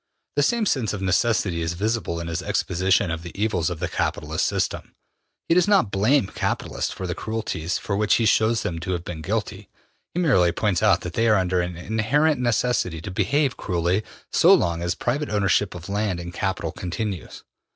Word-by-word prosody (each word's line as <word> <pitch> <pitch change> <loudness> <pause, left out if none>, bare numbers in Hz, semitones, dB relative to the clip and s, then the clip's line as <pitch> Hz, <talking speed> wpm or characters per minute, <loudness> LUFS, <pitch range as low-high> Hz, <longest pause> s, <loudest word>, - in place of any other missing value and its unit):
The 145 - +3
same 230 +9 +2
sense 125 - 0
of 100 -1 -4
necessity 95 -2 +1
is 80 +1 -1
visible 100 -2 -1
in 85 - -5
his 85 -1 -3
exposition 90 -1 +1
of 85 -1 -3
the 85 +3 -9
evils 100 -7 +1
of 85 -3 -5
the 90 - -1
capitalist - - -1
system. - - -2 0.5
He - - +3
does 180 +2 +4
not 195 - +3
blame 110 +6 +3
capitalists - - -2
for 95 - -6
the 90 - -2
cruelties 95 -5 -3
of 100 - 0
which 105 -1 +3
he 115 - +1
shows 110 +1 +3
them 85 -2 -3
to 95 +2 -3
have 85 -1 -3
been 80 -3 -6
guilty; 100 +2 -3 0.5
he - - 0
merely 110 - +4
points 95 -3 0
out 100 -4 +4
that 90 - -6
they 115 0 +2
are 110 -2 +5
under 90 -1 +1
an 90 -1 -4
inherent 125 - +1
necessity 120 -8 0
to 95 +5 -7
behave 130 +9 +1
cruelly 90 +2 0 0.3
so - - +5
long 85 0 0
as 85 +1 -1
private 140 +8 -1
ownership 100 -2 +1
of 80 -3 -8
land 100 -3 -1
and 85 0 -7
capital 95 +1 -2
continues. 90 0 -5
100 Hz, 195 wpm, -24 LUFS, 85-115 Hz, 0.5 s, are